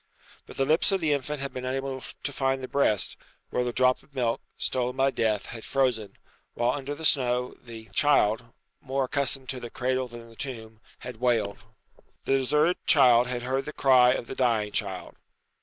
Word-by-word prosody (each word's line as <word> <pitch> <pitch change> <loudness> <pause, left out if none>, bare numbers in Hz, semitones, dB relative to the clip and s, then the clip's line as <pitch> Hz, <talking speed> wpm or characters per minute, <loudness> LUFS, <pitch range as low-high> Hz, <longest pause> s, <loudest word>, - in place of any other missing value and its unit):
But - - -12
the 135 - +2
lips 155 +7 +3
of 195 - +1
the 155 -4 +1
infant 145 +1 -3
had 140 - -4
been 125 - -5
unable 135 +1 -3
to 145 - -7
find 135 -1 0
the - - -4
breast, 110 -9 +1 0.3
where 125 - +1
the 120 - -1
drop 130 +1 +2
of 140 - -25
milk, 120 -3 0 0.2
stolen 125 0 -1
by 135 +1 +2
death, 110 -4 0
had 115 -1 -8
frozen, 125 -6 0 0.4
whilst 120 +4 +1
under 140 +2 -5
the 160 - -6
snow 125 -3 +2
the 115 -2 -10
child, 120 -4 +3 0.4
more 135 0 -1
accustomed 135 0 -1
to 130 - -3
the 120 - -7
cradle 130 +1 -1
than 120 -1 -11
the 115 - -16
tomb, 110 -4 -7 0.2
had 125 -2 -7
wailed. 115 -4 +1 0.7
The 135 - +3
deserted 150 +6 +2
child 125 -5 +6
had 125 -1 -3
heard 130 +2 -1
the 150 - -6
cry 125 -2 +5
of 120 - -3
the - - -7
dying 115 -5 +1
child. 100 -5 -4
130 Hz, 190 wpm, -27 LUFS, 120-135 Hz, 0.7 s, child